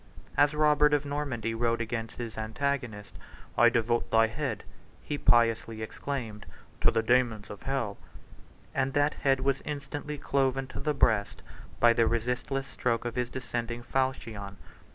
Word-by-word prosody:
As 145 +1 +4
Robert 150 -1 +4
of 145 - -1
Normandy 140 -6 -2
rode 115 0 +1
against 115 -1 -4
his 115 -2 -5
antagonist, 110 -3 -3 0.4
"I 120 +1 +7
devote 120 0 +1
thy 115 0 +5
head," 110 -1 -3 0.4
he 145 - -3
piously 115 -2 +3
exclaimed, 115 -3 -5 0.3
"to - - +5
the 115 - +1
daemons 115 -3 +2
of 105 - -9
hell;" 130 -7 -2 0.7
and 135 0 0
that 145 +1 +3
head 135 -1 +1
was 135 0 +1
instantly 145 0 -5
cloven 135 -1 +1
to - - -6
the 150 -1 -1
breast 110 -6 +1 0.4
by 120 -1 +6
the 115 -1 +3
resistless 125 +4 -1
stroke 120 -3 -1
of 120 - -2
his 125 0 -1
descending 120 -2 -4
falchion. 115 -7 -2
120 Hz, 150 wpm, -29 LUFS, 115-135 Hz, 0.7 s, I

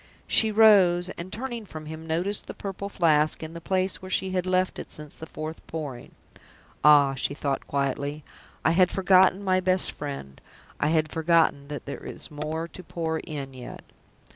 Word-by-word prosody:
She 220 -1 +4
rose, 190 -5 +5
and, 175 +2 -7
turning 240 0 -5
from 155 -6 -9
him, 160 +1 -8
noticed 180 +6 0
the - - -7
Purple 200 0 -6
Flask 155 -5 +2
in 160 +1 -7
the 170 - -8
place 185 +2 -1
where 185 - -8
she 190 0 0
had 185 -1 -1
left 185 0 +1
it - - -8
since 150 -1 -6
the 160 - -9
fourth 155 +1 -7
Pouring. 145 -7 -6 0.7
"Ah," 145 -2 +6
she 135 +1 -2
thought, 140 -2 -3
quietly, 140 +2 -2 0.4
"I 160 - +5
had 180 +1 +4
forgotten 190 0 +4
my 185 -1 +2
best 185 0 +4
friend 140 - -7 0.4
I - - +1
had 155 -1 +1
forgotten 160 -3 +2
that 145 -1 -7
there 140 - -7
is - - -6
more 155 +2 -4
to 185 - -10
pour 160 -2 -3
in 140 -5 -6
yet." 125 -1 -9
160 Hz, 180 wpm, -26 LUFS, 150-185 Hz, 0.7 s, Ah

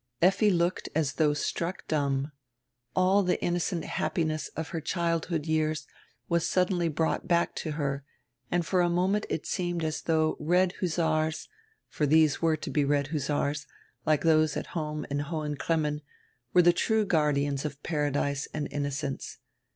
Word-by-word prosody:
Effi 195 +4 +4
looked 175 -1 0
as 150 -3 +1
diough 150 -2 +2
struck 170 +5 -3
dumb. 140 -1 0 0.6
All 185 +2 +4
die 180 -2 +1
innocent 175 -1 -1
happiness 155 -2 -1
of 160 -1 -4
her 165 -3 -3
childhood 165 -1 -1
years 155 -2 0 0.4
was 170 -1 +1
suddenly 180 -2 +1
brought 160 +1 -1
back 170 -1 +2
to 155 - -3
her 140 -2 -2 0.5
and 175 -1 +1
for 180 +2 +2
a 175 - +3
moment 185 +4 +1
it 160 - -2
seemed 175 -2 -2
as 155 0 -2
though 155 -1 +1
red 180 +4 +2
hussars 160 -3 0 0.2
— 440 - -42
for 150 - -1
these 155 0 +4
were 160 -1 +3
to - - -6
he 150 - +3
red 140 0 +1
hussars, 145 0 -1 0.4
like 155 +1 +2
those 155 -2 +3
at - - -4
home 150 -3 -3
in 140 - 0
Hohen 150 0 -3
Cremmen 150 0 0 0.3
— 125 0 -43
were 180 - +6
die 175 - +7
true 220 +4 +1
guardians 145 -5 +1
of 145 -1 -6
Paradise 145 -2 -1
and 150 -1 -2
inno 145 0 -1
cence. 135 -1 -4
155 Hz, 165 wpm, -28 LUFS, 150-175 Hz, 0.6 s, die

